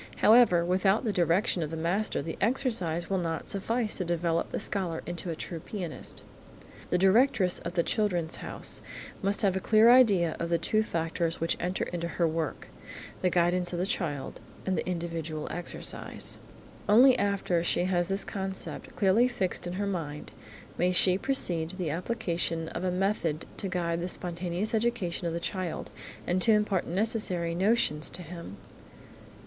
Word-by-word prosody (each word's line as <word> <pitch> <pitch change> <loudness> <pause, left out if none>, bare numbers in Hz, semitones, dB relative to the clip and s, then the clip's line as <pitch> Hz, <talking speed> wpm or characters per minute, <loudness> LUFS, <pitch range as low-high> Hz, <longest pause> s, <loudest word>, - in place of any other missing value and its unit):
However, 215 -7 +5
without 190 +5 +2
the 220 -4 -1
direction 175 +1 +2
of 155 - -2
the 165 - -5
master 175 +1 0
the 165 +1 -5
exercise 220 - 0
will 195 -1 0
not 165 -2 -3
suffice 225 +3 -1
to 185 - -1
develop 170 -1 -1
the - - -3
scholar 185 -5 -2
into 175 +1 -5
a 165 - -2
true 165 +1 -6
pianist. 180 -1 -6 0.7
The 180 - +2
directress 195 -1 +4
of 170 +1 -6
the 170 - +2
"Children's 175 -7 0
House" - - -4 0.4
must 200 +2 +2
have 195 -2 +3
a - - 0
clear 220 +4 +5
idea 200 -10 +5
of 170 - -2
the 170 - +2
two 215 +5 +1
factors 165 -3 -2
which 165 - 0
enter 180 +2 -1
into 170 -1 -4
her 170 0 0
work–the 160 +3 -5
guidance 175 0 +1
of - - -2
the 180 - 0
child, 165 - -3 0.3
and 190 - 0
the - - -2
individual 165 -3 -4
exercise. 175 +2 -4 0.5
Only 250 +5 +7
after 200 -4 0
she 175 - +1
has 175 -1 +1
this 195 +1 -1
concept 190 -1 -4
clearly 210 +5 +4
fixed 195 -8 -2
in 175 - -4
her 200 +2 -2
mind, 160 -7 -4 0.5
may 180 +1 +3
she 185 0 +6
proceed 175 -12 +2
to 185 - -7
the 175 -5 -2
application 170 -3 -1
of 170 - -5
a 185 - +1
method 180 -4 -1
to 195 - -3
guide 170 -2 -1
the 175 - -2
spontaneous 175 +4 -3
education 220 -7 -1
of 165 - -2
the 170 - -2
child 185 -1 -4 0.3
and 180 +1 0
to 225 - +6
impart 210 -3 +1
necessary 185 -3 0
notions 185 -5 +1
to 180 - -8
him. 170 - -9
180 Hz, 170 wpm, -28 LUFS, 170-200 Hz, 0.7 s, Only